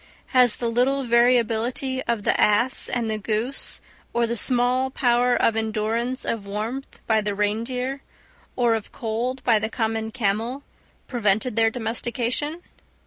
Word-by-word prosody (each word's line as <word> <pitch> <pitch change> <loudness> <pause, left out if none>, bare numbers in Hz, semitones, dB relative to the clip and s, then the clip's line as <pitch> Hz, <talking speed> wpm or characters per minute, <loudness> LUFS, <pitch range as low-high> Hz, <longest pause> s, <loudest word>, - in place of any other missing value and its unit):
Has 250 -4 +4
the 235 - -2
little 265 +4 +1
variability 240 +2 +2
of 230 -3 -1
the - - +1
ass 235 +5 +3
and 225 -3 -2
goose, 225 +6 -1 0.3
or 235 0 +2
the 235 +1 -2
small 250 +3 +2
power 245 -1 +2
of 225 - +2
endurance 225 +3 -1
of 205 -3 -3
warmth 220 +7 -5
by 220 -1 +2
the 205 -1 -2
reindeer, 250 +6 -2 0.5
or 240 -2 +2
of 220 -2 -4
cold 240 +3 -3
by 225 -3 +4
the 220 +1 -2
common 220 -1 -2
camel, 230 +4 -2 0.4
prevented 220 -1 0
their 225 -1 +4
domestication? 245 +7 -2
235 Hz, 140 wpm, -23 LUFS, 220-250 Hz, 0.5 s, Has